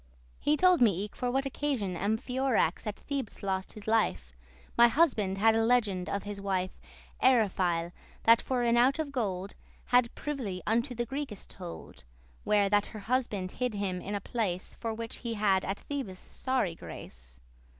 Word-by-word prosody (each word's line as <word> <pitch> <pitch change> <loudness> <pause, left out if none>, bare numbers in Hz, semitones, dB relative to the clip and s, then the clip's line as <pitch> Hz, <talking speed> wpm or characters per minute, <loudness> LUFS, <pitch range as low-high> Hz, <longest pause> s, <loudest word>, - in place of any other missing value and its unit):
He 300 +1 +2
told 365 0 +5
me 200 -5 +4
eke, 210 - -8
for 250 - -1
what 270 +2 0
occasion 265 -9 -1
Amphiorax 220 0 0
at 210 - -2
Thebes 275 -8 -5
lost 190 -1 -2
his 210 -1 -10
life: 220 - +1 0.4
My 235 - +8
husband 230 - +2
had 220 +2 +4
a 225 - +3
legend 215 -6 +2
of 200 - -2
his 205 -1 -6
wife 185 -2 -1 0.5
Eryphile, 185 -9 +3 0.3
that 230 +1 +6
for 250 -2 -1
an 235 0 +3
ouche* 255 +5 +4
of 310 -3 -2
gold 200 -7 -2
*clasp, - - -22 0.4
collar - - +8
Had 235 - -11
privily 240 -11 -4
unto 235 +4 +1
the 240 +1 -1
Greekes 265 -5 -5
told, 175 - -9 0.4
Where 205 -1 +3
that 205 0 +2
her 215 - -8
husband 215 -5 -1
hid 250 -3 -2
him 190 -3 -2
in 205 - -4
a 200 - -2
place, 190 -5 -2
For 225 - -4
which 230 +1 -5
he 235 -2 -4
had 200 -3 +2
at 195 +1 -2
Thebes 270 -10 -5
sorry 255 -4 -1
grace. - - -11
220 Hz, 180 wpm, -30 LUFS, 190-250 Hz, 0.5 s, My